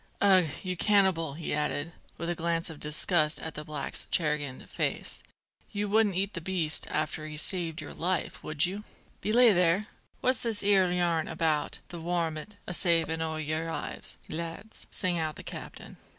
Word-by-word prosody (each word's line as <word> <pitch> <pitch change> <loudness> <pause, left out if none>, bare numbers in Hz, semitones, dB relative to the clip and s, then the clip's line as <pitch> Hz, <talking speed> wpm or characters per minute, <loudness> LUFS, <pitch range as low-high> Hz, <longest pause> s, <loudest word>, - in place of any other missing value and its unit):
"Ugh, 190 -4 +6 0.2
you 185 -1 -1
cannibal!" 185 -6 +3
he 165 - -3
added, 150 +1 0 0.3
with 170 - -4
a 175 - +1
glance 170 0 -1
of 155 - -10
disgust 150 +1 +2
at 160 - -5
the 150 - -5
black's 150 -2 -3
chagrined 150 -5 0
face, - - -1 0.5
"you 205 0 -1
wouldn't 210 -2 +3
eat 195 +2 0
the 170 - -4
beast 170 -3 -1
after 155 0 -2
he 155 - -7
has 150 - -1
saved 170 -3 0
your - - -7
life, 180 +2 -2
would 155 +2 +1
you?" 195 +4 -4 0.4
"Belay 230 +1 +6
there! 180 +4 +3 0.3
what's 255 0 +2
this 225 -4 +1
'ere 195 -3 +5
yarn 175 -3 +1
about 160 -2 0
the 170 -1 -7
warmint 170 +3 -2
a 180 - -4
savin' 165 -2 +3
o' 160 -1 -1
your 155 +1 -2
lives, - - -3
lads?" 165 +6 -5
sang 180 -2 +1
out 155 -2 -1
the - - -9
captain. - - -8
170 Hz, 175 wpm, -29 LUFS, 155-190 Hz, 0.5 s, Ugh